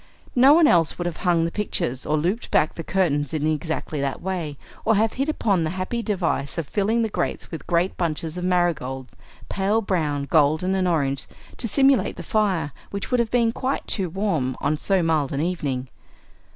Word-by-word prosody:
No 265 +4 +7
one 335 -1 +6
else 170 - +3
would 175 - -3
have 175 -2 -3
hung 170 -2 +2
the 170 - -2
pictures 135 -11 -2
or 155 - +2
looped 180 +10 -1
back 155 - +2
the 165 - -6
curtains 160 -5 0
in 150 -1 -1
exactly 155 -1 -2
that 140 -1 -2
way, 175 -6 -4 0.3
or 225 - +3
have 220 +2 +2
hit 275 +4 -1
upon 200 - +1
the 155 - -1
happy 210 +6 -2
device 175 -10 -1
of 165 -4 -2
filling 220 +6 +1
the - - +1
grate 215 - -3
with 165 -4 -5
a - - -21
great 175 +2 +1
bunch 165 -3 -1
of 160 0 -5
marigolds, 155 -8 -1 0.3
pale 200 +3 +1
brown, 155 -9 -1
golden, 155 +5 +2
and 190 -1 +1
orange, 140 -5 0 0.3
to 235 - -2
simulate 270 +4 +3
the - - -7
fire, 195 - 0 0.2
which 200 +4 -5
would 250 - +3
have 235 -2 +1
been 235 -1 +2
quite 260 +3 -2
too 190 -4 0
warm 165 -9 -1
on 145 +2 +1
so 185 +4 +1
mild 155 -4 +1
an 140 - -2
evening. 145 -7 -2
175 Hz, 200 wpm, -23 LUFS, 150-205 Hz, 0.3 s, No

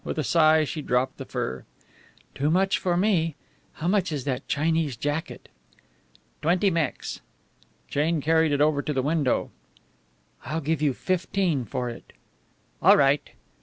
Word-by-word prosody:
With - - -4
a 155 - 0
sigh 155 0 +4
she 155 +1 -4
dropped 130 -1 0
the - - -7
fur. 65 0 -4 0.7
"Too 145 +2 0
much 190 +3 +2
for 175 -2 0
me. 175 -6 +1 0.4
How 160 - -4
much 185 -2 +1
is 145 -4 -3
that 130 -2 -3
Chinese 155 -3 0
jacket?" 145 +6 -4 0.9
"Twenty 180 +5 +2
Mex." 165 -5 -2 0.7
Jane 155 +3 0
carried 160 +1 +2
it 145 0 +1
over 150 -1 +3
to 150 - -3
the 130 -2 0
window. 150 -4 0 0.9
"I 150 - -4
will 165 - -1
give 155 0 -1
you 145 -4 +1
fifteen 185 -6 -1
for 125 +4 -3
it." 115 - -13 0.7
"All - - +7
right." 140 0 +2
155 Hz, 155 wpm, -25 LUFS, 140-165 Hz, 0.9 s, All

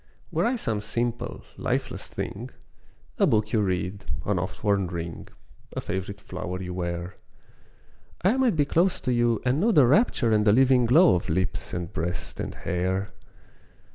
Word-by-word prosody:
Were - - +1
I 250 - +1
some 115 - -2
simple, 120 +2 -3
lifeless - - -2
thing, 115 +6 -5 0.7
A - - +5
book 105 -1 +1
you 110 - +3
read, 95 0 -2 0.2
an 100 -2 +1
oft 95 +4 -5
worn 100 -3 +2
ring, 85 -1 -6 0.5
A - - -3
favourite 95 +2 -4
flower 90 -2 -5
you 90 -1 -5
wear, 85 0 -4 1.1
I 195 +7 +4
might 255 -7 +3
be 145 -2 +3
close 175 +6 +2
to 125 - 0
you 120 -1 +2
and 130 +3 +2
know 220 +6 +3
The 145 - +6
rapture 135 - +3
and 105 -1 +3
the 105 -1 +5
living 130 0 +4
glow 165 +8 +6
Of 90 0 -1
lips, 95 +4 -1
and 85 -1 -4
breast, 85 +3 -3
and - - -4
hair. 95 +2 -1
105 Hz, 170 wpm, -26 LUFS, 90-125 Hz, 1.1 s, The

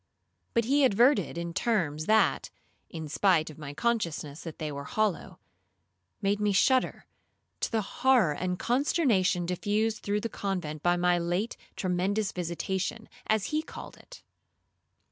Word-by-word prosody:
But 230 -1 +3
he 280 +4 +3
adverted 245 -3 +3
in 170 0 -4
terms 165 -9 0
that 220 0 +3 0.4
(in 160 -2 -6
spite 160 0 +2
of 155 - -14
my 145 -2 -6
consciousness 170 -8 -1
that 165 -3 -8
they 155 -1 -4
were 140 0 -6
hollow) 215 -6 -1 0.9
made 200 +1 +1
me 210 -1 +2
shudder, 255 +7 +2 0.5
to - - -2
the 220 -2 +1
horror 245 - +3
and 180 +3 -2
consternation 235 - +2
diffused 210 +5 -1
through 205 +1 -1
the 230 - -2
convent 180 -8 -4
by 175 +1 +2
my 175 0 +2
late 175 +7 -1 0.2
tremendous 190 +3 0
visitation, 185 +5 -3 0.2
as 215 -2 +1
he 305 - +2
called - - -10
it. - - -15
195 Hz, 145 wpm, -28 LUFS, 170-225 Hz, 0.9 s, But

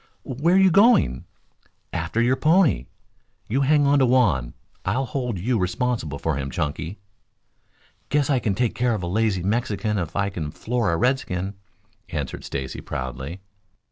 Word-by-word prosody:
"Where 150 +8 +1
are - - +6
you 190 -1 +6
going?" 200 - +4 0.7
"After 115 - -2
your 125 +2 +3
pony. 155 - +3 0.6
You 130 +6 0
hang 145 +1 +4
on 140 0 +4
to 130 - +4
Juan. 95 - +2 0.3
I'll 125 +8 0
hold 125 -3 -3
you 115 +6 0
responsible 90 - -1
for 80 -1 -1
him, 70 -1 -3
Chunky." 80 +5 -3 1.1
"Guess 145 -2 +2
I 135 -3 +2
can 105 -4 -1
take 120 +1 0
care 120 -2 +1
of 100 - -5
a - - -1
lazy 100 -1 0
Mexican 105 0 0
if 85 -1 -4
I 100 0 0
can 80 -6 -4
floor 115 +4 -1
a 85 - +1
redskin," 100 -6 0 0.6
answered - - -4
Stacy 65 -1 -5
proudly. 65 +7 -5
110 Hz, 160 wpm, -23 LUFS, 85-130 Hz, 1.1 s, are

